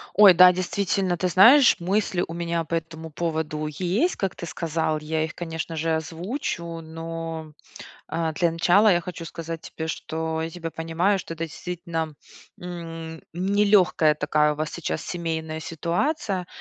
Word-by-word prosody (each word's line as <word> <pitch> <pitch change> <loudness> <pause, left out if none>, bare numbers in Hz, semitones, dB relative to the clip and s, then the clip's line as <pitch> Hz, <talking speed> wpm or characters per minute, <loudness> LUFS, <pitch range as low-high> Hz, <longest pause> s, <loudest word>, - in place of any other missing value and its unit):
Ой, 200 -2 +9
да, 180 +1 +8
действительно, 185 0 -1
ты 185 - 0
знаешь, 235 +10 +7
мысли 185 0 0
у 165 - -7
меня 170 0 -1
по 165 +1 -3
этому 160 -1 -5
поводу 155 -1 -2
есть, 185 - 0
как 195 -2 -2
ты - - -6
сказал, 160 -2 -1
я 155 +1 -1
их, 160 - -5
конечно 165 -1 -5
же, 160 +1 0
озвучу. 170 - -4
Но, 165 -1 -6 0.6
э, 165 -1 -1
для 170 +2 +1
начала 180 +6 +4
я 175 -1 +3
хочу 170 -1 -7
сказать 165 0 -6
тебе, 160 0 -6
что 160 0 -3
я 160 - -2
тебя 165 -1 -6
понимаю, 165 +5 0
что 165 - -6
это 165 0 -3
действительно, 165 -2 -5 0.4
м, 165 -2 -7
нелегкая 190 -4 +3
такая 150 0 +2
у - - -10
вас 155 +1 -3
сейчас 170 - -3
семейная 160 -2 -3
ситуация. 180 - -2
165 Hz, 155 wpm, -24 LUFS, 160-180 Hz, 0.6 s, Ой